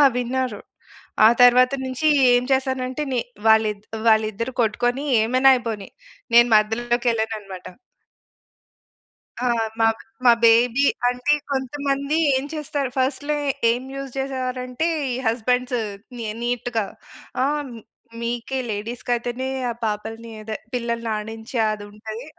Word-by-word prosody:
విన్నారు. 250 -3 -2 0.7
ఆ - - +10
తరువాత 250 +1 +6
నుంచీ 260 +4 -1 0.3
ఏం 245 0 +3
చేశానంటే, 260 +1 0
ని 250 - +1 0.3
వాళ్ళిద్ 215 -2 +3 0.2
వాళ్ళిద్దరు 220 +2 +2
కొట్టుకొని 245 +4 0 0.2
ఏమైనా 255 +4 +5
అయిపోని. 225 -5 -4 0.5
నేను 235 +1 +7
మధ్యలోకెళ్ళననమాట. 220 -3 0 1.8
ఆ! - - +2 0.3
మా, 225 - +5 0.4
మా 240 - +9
బేబీ 235 +4 +5 0.2
అంటే 250 +4 +1 0.2
కొంతమంది 280 +2 -1 0.2
ఏం 265 +1 -1
చేస్తారు? 295 -3 -3
ఫస్ట్‌లో 285 +3 0 0.4
ఏం 245 +2 -2
యూజ్ 275 -1 -6
చేసేవారంటే 255 +1 -2 0.2
ఈ - - -1
హస్బండ్స్ 250 +2 0 0.4
నీ 235 - -5 0.2
నీట్‌గా, 240 -2 -1 0.6
ఆహ్, 295 +2 0
మీ 235 -3 -10 0.4
మీకే 240 +3 -3
లేడీస్‌కి 225 +4 -5
అయితేనే 245 +2 -3 0.2
ఆ - - -4
పాపల్ని, 225 +2 -4
అదే 215 0 -5 0.2
పిల్లల్ని 235 -1 -2
ఆడించే 220 +3 -6
అది 210 -1 -8
ఉంటది. 220 +3 -8
245 Hz, 115 wpm, -22 LUFS, 225-260 Hz, 1.8 s, ఆ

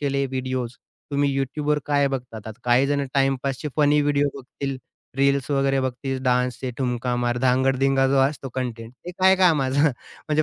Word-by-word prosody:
केले 140 -1 0
व्हिडिओज, 130 -2 -3 0.4
तुम्ही 140 -1 +1
YouTubeवर 150 +2 -1
काय 145 -1 +2
बघतात? 120 -5 -6
आता 110 +2 -9
काही 125 +3 +4
जण 140 -1 0
टाईमपासचे 135 +1 0
फनी 150 -1 +4
व्हिडिओ 145 0 +2
बघतील, 135 0 -6 0.4
रील्स 140 0 +1
वगैरे 135 -1 +2
बघतील, 130 +1 -3
डान्सचे 125 0 0
ठुमका 125 -1 -1
मार, 120 0 0
धांगड-धिंगा 135 +1 +2
जो 140 - +2
असतो 140 -1 -5
कंटेंट 120 -3 -4
ते 180 - -5
काय 190 +1 +6
कामाचा. 145 -7 +3 0.5
म्हणजे 155 0 +2
135 Hz, 155 wpm, -23 LUFS, 125-140 Hz, 0.5 s, काय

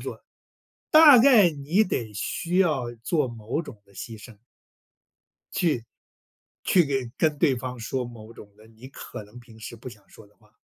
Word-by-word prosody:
作， - - -8 0.7
大 310 -4 +8
概 230 -7 +6
你 155 +8 0
得 115 - -4
需 170 - -3
要 150 -10 +1
做 150 0 0
某 115 +4 -4
种 115 -11 -12
的 100 - -25
牺 110 +3 -9
牲。 105 -1 -14 1.2
去 170 -3 +1 0.9
去 180 -3 +3
给 135 -4 -3
跟 155 -2 +1
对 145 -5 +3
方 125 +1 -6
说 125 +2 -3
某 115 -2 -12
种 105 -3 -15
的， 110 +1 -19
你 115 +3 -14
可 130 - -10
能 105 +4 -15
平 115 -2 -17
时 110 - -9
不 115 +3 -10
想 105 -4 -17
说 110 - -17
的 105 - -30
话。 105 -1 -28
125 Hz, 185 characters per minute, -25 LUFS, 110-160 Hz, 1.2 s, 大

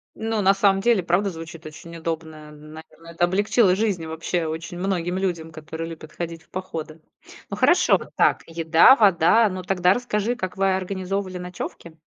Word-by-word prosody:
Ну, 225 -1 -2
на 195 +1 +5
самом 195 -1 +2
деле 235 -3 +3
правда 185 +3 0
звучит 165 0 -10
очень 165 +2 -10
удобное. 160 -2 -6
Наверно, 155 +2 -14
это 170 +1 -3
облегчило 195 +2 +2
жизнь 195 -5 -1
вообще 165 +1 -3
очень 160 +2 -5
многим 180 -1 -2
людям, 170 -4 -3
которые 160 +1 -7
любят 155 -1 -10
ходить 165 -1 -6
в - - -33
походы. 165 -4 -7 0.5
Ну - - -5
хорошо, - - +4 0.2
так, - - +2
еда, 165 +8 +5
вода. 205 +1 +4
Ну 185 0 -6
тогда 180 -1 +2
расскажи, 240 0 -2
как 185 -6 -5
вы 195 -1 +1
организовывали 190 0 -4
ночёвки? 175 -2 -8
175 Hz, 165 wpm, -23 LUFS, 160-195 Hz, 0.5 s, на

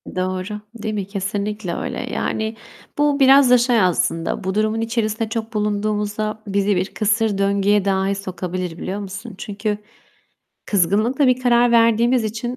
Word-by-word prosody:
Doğru, 185 +3 -3
değil 220 -1 -4
mi? 200 -3 -3
Kesinlikle 200 -1 -3
öyle. - - -4 0.2
Yani, 220 +1 -2 0.4
bu 290 -1 +2
biraz 270 -1 +6
da 250 - +7
şey 240 -2 +3
aslında 170 -1 0
bu 190 +1 -2
durumun 215 +1 +1
içerisinde 225 -1 -1
çok 225 0 -4
bulunduğumuzda 210 0 -1
bizi 200 0 +1
bir 185 +2 -2
kısır 215 -1 +1
döngüye 200 0 +2
dahi 195 0 +1
sokabilir, 185 -3 -5
biliyor 190 +4 -4
musun? 200 +2 -7
Çünkü 205 +1 -3 0.9
kızgınlıkla 215 - +2
bir 255 0 +2
karar 240 -1 +4
verdiğimiz 230 +1 +3
için 230 +3 -4
210 Hz, 145 wpm, -20 LUFS, 195-230 Hz, 0.9 s, da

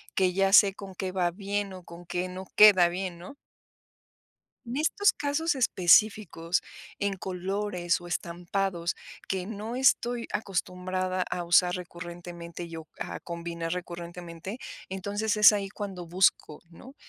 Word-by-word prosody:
que 185 -2 +2
ya 195 0 +2
sé 200 -2 +8
con 195 -2 -9
qué 185 0 -3
va 175 -2 +1
bien 200 +1 -3
o 185 -1 -10
con 170 +1 -12
qué 180 +1 -2
no 185 +1 -7
queda 195 -5 +8
bien, 180 0 -4
¿no? 185 +11 -10 1.3
En 240 +1 -5
estos 365 +7 +3
casos 295 +3 0
específicos, 190 -6 +3 0.4
en 200 -1 0
colores, 185 -1 -2
o 175 - -10
estampados 175 +1 -2 0.3
que 190 -1 -2
no 220 +2 -5
estoy 245 -2 +2
acostumbrada 185 -1 -2
a 175 - -2
usar 180 +1 +4
recurrentemente, 175 -1 -8
yo 160 -1 -9
a - - -5
combinar 170 -1 -5
recurrentemente. 175 +3 -6 0.3
Entonces 205 +3 -2
es 210 0 +9
ahí 200 -2 -1
cuando 190 -4 -6
busco, 175 -3 +1
¿no? 260 +11 -13
185 Hz, 135 wpm, -28 LUFS, 175-205 Hz, 1.3 s, es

